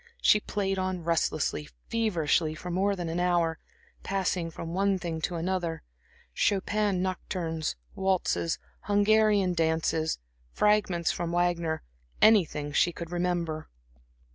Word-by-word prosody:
She 210 - +5
played 195 -2 -2
on 185 -2 -2
restlessly, 160 - 0 0.2
feverishly, 170 -8 +1
for 180 +3 -6
more 195 +3 +1
than 175 -3 -4
an 165 +2 -2
hour, 175 -2 +1 0.4
passing 185 -3 -1
from 165 0 -7
one 195 +1 +2
thing 165 -3 -4
to 175 - -2
another; 170 -1 -2 0.5
Chopin 200 - +1
nocturnes, 170 - -2 0.2
waltzes, 190 -3 0 0.3
Hungarian 205 -2 +3
dances, 160 -1 +1 0.3
fragments 200 - +2
from 170 -1 -3
Wagner; 170 -2 0 0.4
anything 165 -9 +4
she 170 +4 +3
could 170 0 -8
remember. 175 -3 -2
175 Hz, 115 wpm, -28 LUFS, 165-195 Hz, 0.5 s, She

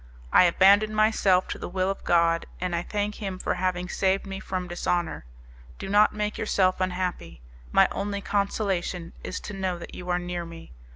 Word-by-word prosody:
I - - +7
abandon 200 +5 +5
myself 210 -4 +3
to - - -4
the - - -5
will 185 +1 0
of 195 - -7
God, 170 -1 +2
and 180 -1 -2
I 170 - 0
thank 210 +3 -3
Him 195 -2 -3
for - - -1
having 180 0 -1
saved 190 +2 0
me 195 0 -6
from 185 -3 -4
dishonour. 175 - -2 0.5
Do 195 - -6
not 210 +1 +5
make 210 0 -3
yourself 190 -3 +1
unhappy. 180 - -3 0.3
My - - +5
only 200 0 -3
consolation 195 -4 -2
is - - -4
to 210 - -7
know 190 -2 -2
that 170 - -10
you 180 0 -8
are 175 - +2
near 175 -1 -4
me. 165 -1 -11
185 Hz, 185 wpm, -26 LUFS, 175-200 Hz, 0.5 s, I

